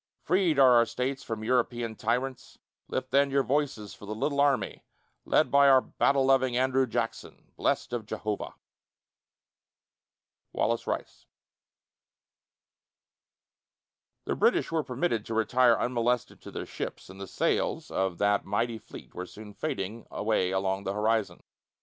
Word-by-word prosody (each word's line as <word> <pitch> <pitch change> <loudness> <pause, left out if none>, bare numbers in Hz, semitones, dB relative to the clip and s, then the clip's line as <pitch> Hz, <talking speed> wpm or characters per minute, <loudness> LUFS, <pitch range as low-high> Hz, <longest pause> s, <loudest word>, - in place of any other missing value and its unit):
Freed 180 -3 +2
are 135 -2 +7
our 115 - +5
States 130 +3 -3
from 110 -3 -5
European 120 -1 0
tyrants: 125 +4 -2 0.3
Lift 130 0 -4
then 140 0 +4
your 140 0 +2
voices 135 -7 -1
for 105 - -12
the 110 - -4
little 140 +6 -1
army 140 -2 +1 0.4
Led - - +2
by 140 0 +6
our 135 -1 +7
battle 135 +1 +1
loving 130 -2 +3
Andrew 130 0 +2
Jackson, 115 0 -4
Blest - - -1
of 115 -3 -3
Jehovah. 110 -1 -4 2.0
WALLACE 115 0 0
RICE. - - -5 3.0
The - - -1
British - - +2
were 160 -2 0
permitted 125 -4 -1
to 115 - -3
retire 120 +2 +4
unmolested 120 0 -1
to - - -10
their - - -5
ships, - - -6
and 95 +1 -11
the 100 - -6
sails - - -1
of 95 -2 -1
that 100 0 +2
mighty 115 +3 -1
fleet 110 - -13
were 90 +1 -6
soon 105 +1 -11
fading 105 +2 -4
away 105 -4 0
along 95 +1 -1
the 95 - -2
horizon. 105 -3 0
115 Hz, 140 wpm, -28 LUFS, 105-130 Hz, 3.0 s, are